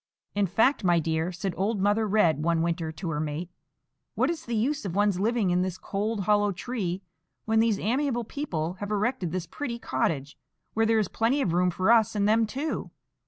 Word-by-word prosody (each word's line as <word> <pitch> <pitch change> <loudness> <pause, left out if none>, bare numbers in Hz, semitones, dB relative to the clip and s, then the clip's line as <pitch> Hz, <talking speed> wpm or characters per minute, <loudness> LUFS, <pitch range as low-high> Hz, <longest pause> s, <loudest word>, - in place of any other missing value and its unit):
"In 200 -1 +1
fact, 225 +9 +2
my 175 -2 +4
dear," 160 +1 0
said 185 +1 -3
old 205 +2 0
Mother 205 +3 +2
Red 175 -8 +3
one 165 0 +2
winter 165 -1 -1
to 165 +2 -5
her 150 - -2
mate, 155 +3 -3 0.6
"what - - +2
is 335 - -6
the 235 - -2
use 265 +6 0
of 190 -4 -4
one's 205 -2 +2
living 215 -2 +1
in 180 +1 +2
this 185 -1 -2
cold, 205 +2 -2
hollow 205 +1 +3
tree, 190 -3 -3 0.4
when 220 0 +2
these 225 -2 +3
amiable 245 +2 0
people 180 - -3
have 205 - -4
erected 210 -4 -1
this 180 -1 -2
pretty 235 - -5
cottage, 140 - -2 0.3
where 225 0 +2
there 225 0 +3
is 215 -4 +2
plenty 230 +9 +1
of 185 -12 0
room 180 +1 +3
for 185 +5 +2
us 225 -2 +4
and 205 -1 +2
them 220 +1 +3
too? 280 +7 -3
205 Hz, 205 wpm, -27 LUFS, 175-225 Hz, 0.6 s, my